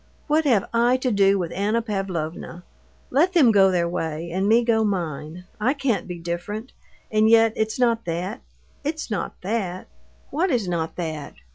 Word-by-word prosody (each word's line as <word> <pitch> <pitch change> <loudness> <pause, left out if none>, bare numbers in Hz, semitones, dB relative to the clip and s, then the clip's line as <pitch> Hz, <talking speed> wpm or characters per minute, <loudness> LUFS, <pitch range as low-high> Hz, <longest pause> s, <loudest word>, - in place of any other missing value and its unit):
What 310 +1 +2
have 230 -8 +3
I 240 +2 +3
to 255 -1 -1
do 200 -1 +4
with 175 -3 -3
Anna 210 +4 0
Pavlovna? 180 -6 -4 0.5
Let 330 +8 +3
them 285 -10 +6
go 195 -2 +5
their 175 -2 +1
way, 165 -1 -3
and 190 +3 0
me 235 +2 +5
go 225 -1 +2
mine. 170 -4 -3 0.2
I 250 +7 +1
can't 275 -6 -1
be 180 -1 -5
different.... 175 +8 -5 0.4
And 215 0 +4
yet 225 -1 +5
it's 220 0 -1
not 235 -2 +1
that, 180 +8 -3 0.4
it's 305 -3 -3
not 205 - -3
that." 190 -3 -2 0.5
"What 350 +6 +1
is 240 - 0
not 165 -2 -2
that?" 160 -4 -5
205 Hz, 170 wpm, -23 LUFS, 175-235 Hz, 0.5 s, them